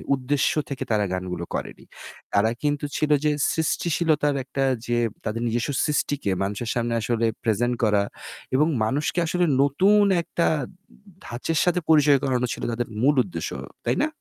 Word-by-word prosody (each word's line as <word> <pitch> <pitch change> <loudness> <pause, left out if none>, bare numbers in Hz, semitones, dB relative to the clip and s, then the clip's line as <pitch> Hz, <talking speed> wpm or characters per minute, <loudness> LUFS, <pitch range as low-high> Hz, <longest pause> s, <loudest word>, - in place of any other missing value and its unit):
উদ্দেশ্য 135 +2 0 0.2
থেকে 140 -3 -4
তারা 105 -2 +2
গানগুলো 90 -2 -4
করেনি। - - -6 0.5
তারা 105 +3 +3
কিন্তু 145 0 0
ছিল 150 -1 0
যে 150 - +3 0.2
সৃষ্টিশীলতার 160 -2 +1
একটা 135 +1 -2 0.2
যে 120 - +1 0.3
তাদের 110 +2 -2
নিজস্ব 120 +5 -1
সৃষ্টিকে 145 -6 -1
মানুষের 105 +4 -3
সামনে 120 -1 -1
আসলে 115 +1 0 0.2
প্রেজেন্ট 120 +2 +1
করা 105 -2 +3 0.5
এবং 150 +4 +4 0.2
মানুষকে 145 +9 0
আসলে 175 +2 +1 0.2
নতুন 190 +9 +4 0.2
একটা 170 0 -1 0.8
ধাঁচের 140 +7 -2
সাথে 180 0 +2
পরিচয় 150 -3 +6
করানো 125 -2 +1
ছিল - - -8
তাদের 120 +1 -2
মূল 145 +3 +4
উদ্দেশ্য। 180 - -5 0.4
তাই - - +1
না? - - +2
135 Hz, 150 wpm, -24 LUFS, 115-150 Hz, 0.8 s, পরিচয়